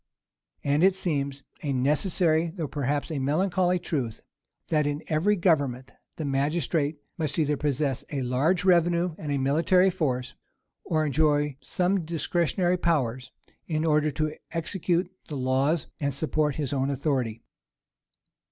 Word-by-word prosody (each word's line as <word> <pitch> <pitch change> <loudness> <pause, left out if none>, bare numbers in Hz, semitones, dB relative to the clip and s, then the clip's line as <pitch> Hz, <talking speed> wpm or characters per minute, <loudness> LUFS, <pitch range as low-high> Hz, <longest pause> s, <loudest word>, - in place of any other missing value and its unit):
And 145 +3 +2
it 190 0 +5
seems 140 -7 -2 0.2
a 145 - -2
necessary, 160 +5 +2
though 165 -2 -4
perhaps 145 +2 -2
a 150 - -2
melancholy 180 +6 +1
truth, 135 -10 -3 0.5
that 150 -2 +2
in 145 +1 -3
every 170 +7 +2
government, 140 -9 +1 0.2
the 155 - -4
magistrate 145 +2 0 0.2
must 150 -3 -1
either 150 -2 +2
possess 140 -2 -1
a 140 -3 -2
large 155 +9 +1
revenue 175 -1 +3
and 150 -2 -4
a 140 - +1
military 165 +8 +3
force, 130 -8 -2 0.5
or 155 -2 0
enjoy 150 -1 +2
some 185 +1 0
discretionary 175 +2 0
powers, 130 -8 0 0.4
in 155 -1 -1
order 150 -1 +3
to 155 +1 -2 0.2
execute 175 +1 -1 0.2
the 150 - -5
laws 135 +5 +1
and 140 -2 -1
support 150 -1 +1
his 145 -3 -2
own 135 0 0
authority. 130 -5 -1
150 Hz, 135 wpm, -27 LUFS, 140-170 Hz, 0.5 s, it